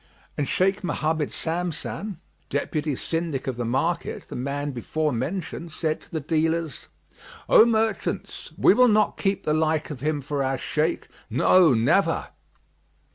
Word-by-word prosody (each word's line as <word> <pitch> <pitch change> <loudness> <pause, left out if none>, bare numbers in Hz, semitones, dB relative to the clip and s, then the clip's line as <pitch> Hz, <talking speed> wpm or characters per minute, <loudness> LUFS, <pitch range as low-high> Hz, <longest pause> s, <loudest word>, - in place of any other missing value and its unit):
"[FN#35] - - -33 0.3
And 145 - 0
Shaykh 195 +2 +1
Mohammed 155 -2 -1
Samsam, 175 +4 -4 0.3
Deputy 150 -2 -1
Syndic 165 -2 -2
of 130 - -2
the 120 - -2
market, 165 +9 -1
the - - -6
man 140 +3 -2
before 150 +4 -2
mentioned, 165 +6 -4
said 155 -1 -2
to - - -19
the 160 - -2
dealers, 160 0 -1 0.6
"O 225 - +7
merchants, 225 -1 -1
we - - +6
will 250 0 +6
not 215 -2 +3
keep 195 -1 0
the 150 - +1
like 155 0 +1
of 140 - -6
him 150 +2 -1
for 145 +1 -2
our 135 0 0
Shaykh; 155 +5 -1 0.2
no, 175 -8 +5
never!" 150 - +2
155 Hz, 150 wpm, -25 LUFS, 145-175 Hz, 0.6 s, O